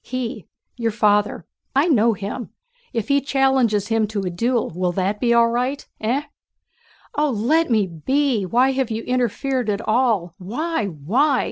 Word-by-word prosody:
He, 235 -7 -5 0.3
your 230 -2 0
father, 210 -1 +1 0.3
I 280 +5 +4
know 235 -7 +4
him... 205 +4 -5 0.4
if 225 -3 -2
he 280 0 +3
challenges 265 -7 +2
him 225 -1 +2
to 205 -1 -3
a 185 -2 -3
duel 235 +6 0
will 180 0 0
that 195 +3 -1
be 240 -2 +1
all 235 0 +5
right? 250 +4 -2
Eh?" 245 +7 0 0.9
"Oh, 300 0 +2
let 275 +8 +1
me 215 -4 +3
be! 235 - 0
Why 245 +8 +3
have 265 -2 -1
you 225 0 -3
interfered 250 0 -1
at 210 +1 -2
all? 215 -7 +1
Why? 235 - -2
Why? 225 - +1
230 Hz, 160 wpm, -21 LUFS, 205-265 Hz, 0.9 s, all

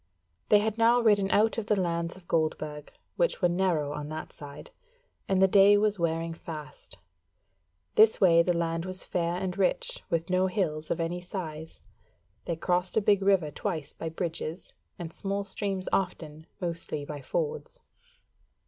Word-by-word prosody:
They 210 - +7
had 215 +1 -1
now 235 +2 +5
ridden 205 -4 +3
out 220 +3 +3
of 215 - -6
the 210 -3 +2
lands 170 -1 -1
of 180 -2 -18
Goldburg, 155 -2 -1 0.3
which - - +1
were 180 - +4
narrow 175 -5 0
on 150 0 -5
that 155 0 -6
side, 145 -1 -11 0.6
and 190 -1 +3
the 190 - +6
day 200 +1 +6
was 210 -1 +1
wearing 165 0 -1
fast. 150 -8 -8 1.0
This 220 0 +5
way 170 -3 +6
the 175 0 +1
land 165 0 -1
was 185 0 -3
fair 170 -1 -1
and 185 0 -3
rich, - - 0
with 165 0 0
no 185 +1 +2
hills 160 -5 -2
of - - -1
any 170 +2 -2
size. 160 -4 -7 0.6
They 170 - -1
crossed 180 +3 0
a - - +7
big 200 -1 +3
river 190 -6 +3
twice 155 -3 -4
by 165 - -5
bridges, 165 +1 -5 0.2
and 170 -2 -7
small 200 0 -2
streams 195 -1 -2
often, 160 -4 -2
mostly 165 -4 -3
by 145 0 -6
fords. 470 - -3
180 Hz, 165 wpm, -28 LUFS, 165-200 Hz, 1.0 s, They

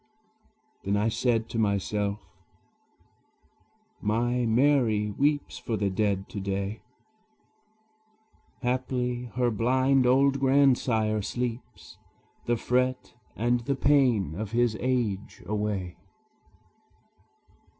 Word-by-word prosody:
Then 100 +1 0
I 105 +2 +1
said 115 -1 0
to 115 - -3
myself, 100 0 0 1.8
"My 120 +3 0
Mary 115 -4 +2
weeps 145 +4 0
For 115 -3 -3
the 100 -1 0
dead 100 -1 0
to 105 - -6
day: 100 +2 -3 1.8
Haply 125 -1 -1
her 125 -1 +1
blind 130 +4 +2
old 135 +2 +3
grandsire 125 -6 +2
sleeps 120 +3 -5 0.5
The 120 0 +2
fret 125 +2 -1 0.2
and 120 +2 +1
the 135 +4 -2
pain 130 - +2
of 105 +4 -5
his 120 -2 +2
age 120 -6 -2
away." 105 -4 -3
120 Hz, 95 wpm, -27 LUFS, 105-125 Hz, 1.8 s, old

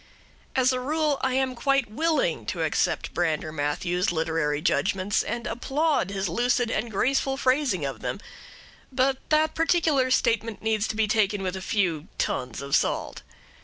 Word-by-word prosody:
As 260 0 +3
a 255 - -1
rule, 300 +2 0
I 260 -1 0
am 265 -1 +1
quite 270 -1 +1
willing 330 - 0
to - - -2
accept - - 0
Brander 155 -1 -1
Matthews's 160 +5 -1
literary 160 -3 0
judgments 190 +4 +1
and 235 0 -4
applaud 275 - 0
his 195 -1 -2
lucid 240 +5 +1
and 225 +2 -1
graceful 270 +5 +1
phrasing 255 - +1
of 135 -5 -5
them; - - -3 0.7
but 265 +1 +2
that 310 0 +3
particular 320 -5 +2
statement 230 -4 +1
needs 220 -1 +1
to - - -4
be 220 0 +2
taken 205 -2 +1
with 185 0 -2
a 190 - -5
few 180 -6 -1
tons 125 +1 -2
of 140 0 +1
salt. - - -1
225 Hz, 160 wpm, -26 LUFS, 185-270 Hz, 0.7 s, As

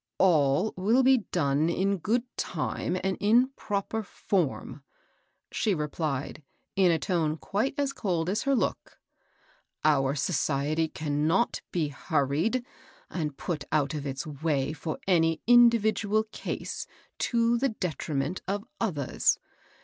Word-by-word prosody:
" - - -61
All 165 +1 +3
will 220 +8 +3
be 260 0 +5
done 150 -1 +2
in 195 +3 0
good 230 +8 +1
time 180 - -2
and 190 0 0
in 235 +5 +4
proper 220 -3 -3
form," 180 -7 -2 0.7
she 210 -4 +1
replied, 150 -1 -3 0.3
in 190 -3 +5
a 165 - +3
tone 160 -3 0
quite 215 - -1
as 280 -1 0
cold 175 -9 -1
as 195 +4 0
her 275 -1 +2
look. - - -2 0.4
" - - -20
Our 140 -2 +3
society 150 +1 0
cannot 155 +8 0
be 160 -4 0
hurried 155 - 0 0.5
or 155 -4 -1
put 155 +1 -4
out 145 -2 +1
of 145 -2 -4
its 135 -1 -4
way 150 -1 -1
for 155 0 -4
any 165 -3 +2
individual 220 -3 +4
case - - -5 0.3
to 235 0 +2
the 275 +2 +2
detriment 160 - -3
of 205 +2 -2
others. 155 - +1
175 Hz, 135 wpm, -28 LUFS, 150-215 Hz, 0.7 s, be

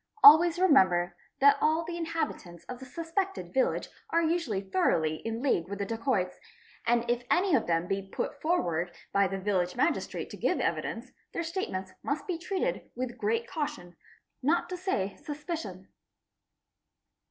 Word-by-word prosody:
Always 330 +4 +9
remember 185 - +4 0.3
that 280 +1 +6
all 315 +2 +3
the 340 +1 -4
inhabitants 325 - -4
of 250 -1 -8
the 265 - -9
suspected 345 +6 -3
village - - +1 0.2
"are 335 +1 +2
usually 320 - 0
throughly 165 -5 +1
in 225 +5 -4
league 180 - +1
with 200 - -4
the 200 - -2
dacoits, 225 -4 -1 0.5
and 235 0 +2
if 240 0 +1
any 370 -1 +3
of 255 - +3
them 165 0 +1
be 195 0 -3
ut 285 - -3
forward 175 - +1 0.2
by 200 -1 +4
the 195 +1 -3
village 185 -2 0
magistrate 285 +7 -1
to - - -7
give - - +1
evidence, - - -2 0.2
their 335 - -2
statements 320 - -4
must 285 +2 -2
be 350 -3 -3
treated 390 +7 -2
with 250 -1 -4
great 225 +2 0
caution, 180 - -4 0.5
not 310 +6 +1
to 365 - -3
say 275 - -2
suspicion. 295 - -6
250 Hz, 155 wpm, -29 LUFS, -, 0.5 s, Always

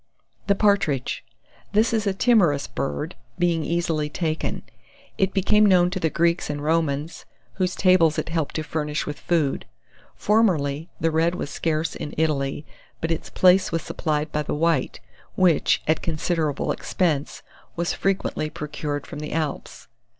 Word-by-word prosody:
THE 200 - +4
PARTRIDGE. 195 - +1 0.5
This 220 +3 +3
is 220 -2 0
a 195 - +2
timorous 180 - +3
bird, 70 0 -3 0.2
being 170 -2 +1
easily 165 -2 -1
taken. 160 0 -2 0.6
It 190 -2 +2
became 210 +2 +3
known 180 -3 +5
to 185 - -2
the 160 - +1
Greeks 170 +1 +1
and 145 -1 -3
Romans, 155 -1 -1 0.3
whose 185 -1 0
tables 185 -4 +4
it - - -2
helped 160 -3 -2
to 155 - -1
furnish 150 0 -2
with 150 - -5
food. 155 -6 0 0.5
Formerly, 165 -8 +1
the 165 - +1
Red 165 +2 +2
was 145 - -4
scarce 160 -1 -1
in 150 - -6
Italy, 150 -2 0 0.3
but 165 - -2
its 165 - -3
place 185 +1 +4
was 165 -1 -1
supplied 155 -1 -2
by 150 - 0
the 150 - -3
White, 160 -3 +1 0.4
which, 175 -5 +3
at 160 0 +2
considerable 155 -2 -1
expense, 155 -6 -1 0.3
was 170 0 -1
frequently 190 -5 -1
procured 150 -1 -4
from 145 - -8
the 150 - -5
Alps. 155 -3 -4
165 Hz, 150 wpm, -24 LUFS, 150-180 Hz, 0.6 s, known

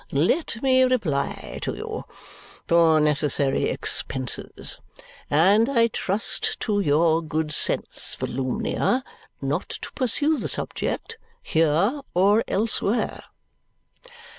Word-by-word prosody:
let 220 - +1
me 260 -1 +4
reply 210 - 0
to - - -3
you. - - -5 0.6
For 165 -2 +5
necessary 145 -2 +1
expenses. 130 -2 -4 0.5
And 195 - +4
I 230 -4 +3
trust 205 0 -1
to 205 -2 0
your 160 -1 +3
good 155 -1 -2
sense, - - -1
Volumnia, 135 - -1 0.4
not - - -1
to - - -7
pursue 290 +4 0
the - - -3
subject, 460 - -4 0.2
here 165 - +2
or 200 +5 +4
elsewhere." 220 +1 0
180 Hz, 100 wpm, -24 LUFS, 150-230 Hz, 0.6 s, For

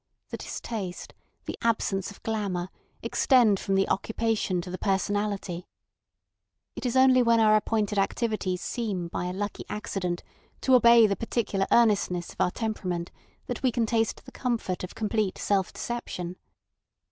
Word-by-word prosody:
The - - -5
distaste, 195 -6 -6 0.3
the - - -5
absence 210 -4 0
of 200 - -14
glamour, 195 -5 -2 0.3
extend 235 -7 +4
from 195 - -1
the 195 0 +3
occupation 220 -3 0
to 180 - -8
the 185 - -5
personality. 195 -2 -1 1.1
It - - -3
is 240 - -2
only 260 -1 +6
when 230 -1 +4
our 215 -1 +6
appointed 210 -1 +1
activities 195 -3 -1
seem 195 -8 -3
by 175 - -3
a 180 - -2
lucky 205 +3 -4
accident 185 -4 -3 0.4
to 265 - +3
obey 235 -2 +8
the 200 -2 +1
particular 215 -4 -1
earnestness 200 -6 +3
of - - -5
our - - +4
temperament 180 -5 -3 0.3
that - - -4
we 255 - +2
can 230 0 +1
taste 225 -1 0
the - - -11
comfort 230 -8 -2
of 180 - -7
complete 215 -2 -1
self 195 -3 0
deception. 185 -7 -5
205 Hz, 150 wpm, -27 LUFS, 185-230 Hz, 1.1 s, obey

